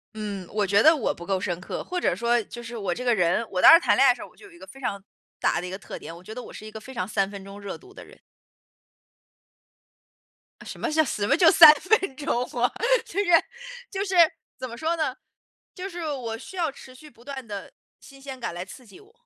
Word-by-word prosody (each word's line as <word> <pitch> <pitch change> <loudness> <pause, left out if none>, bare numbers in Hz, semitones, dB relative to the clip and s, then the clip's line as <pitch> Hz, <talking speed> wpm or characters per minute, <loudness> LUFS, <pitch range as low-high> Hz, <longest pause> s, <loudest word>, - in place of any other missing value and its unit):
嗯， 205 -4 -5
我 205 -2 0
觉 200 +2 +4
得 315 +1 +7
我 270 - -1
不 170 - -11
够 195 0 0
深 175 -3 -3
刻， 185 - -6
或 360 0 -3
者 - - +1
说 235 +1 +1
就 240 - -10
是 235 0 -8
我 195 -5 -2
这 250 - -6
个 240 -2 +2
人 180 +3 +1
我 185 - -3
当 - - +10
时 335 - +9
谈 - - +2
恋 270 - +6
爱 250 - +7
的 - - -2
时 - - -12
候， - - -8
我 - - -25
就 - - -16
有 400 - -15
一 345 - -17
个 - - -12
非 270 - -14
常 200 -6 -4 0.4
大 - - +1
的 175 - -6
一 180 - -6
个 190 - -5
特 195 - -9
点， 165 - -9
我 175 - -14
觉 220 - -10
得 250 - -6
我 - - -12
是 - - -10
一 - - -8
个 220 - -8
非 265 +4 -12
常 185 -5 -3
三 195 -2 0
分 200 -1 -9
钟 195 +1 -11
热 200 -1 -6
度 380 0 -17
的 - - -11
人。 - - -18 2.4
呃， - - -12
什 - - -9
么 - - -2
叫 315 +1 +3
什 205 -8 -2
么 - - +4
就 330 -2 +6
3 315 -3 +10
分 380 -3 +1
钟 255 -3 -1 0.2
啊！ 245 - +3 0.3
就 405 -3 -4
是 405 - +1 0.6
就 395 +1 -3
是， 380 - -3 0.4
怎 255 - -6
么 235 - -9
说 320 +6 -1
呢， 310 -6 -2 0.6
就 380 +1 -6
是 350 -2 -7
我 230 -5 -4
需 380 - -11
要 330 -4 0
持 260 -1 -14
续 305 +3 -14
不 235 -3 -21
断 270 -2 -7
的 205 -3 -8 0.3
新 275 -1 -16
鲜 270 -1 -8
感 235 -7 -4
来 175 +1 -5
刺 245 +6 -13
激 220 - -16
我。 420 +2 -21
245 Hz, 285 characters per minute, -25 LUFS, 200-310 Hz, 2.4 s, 当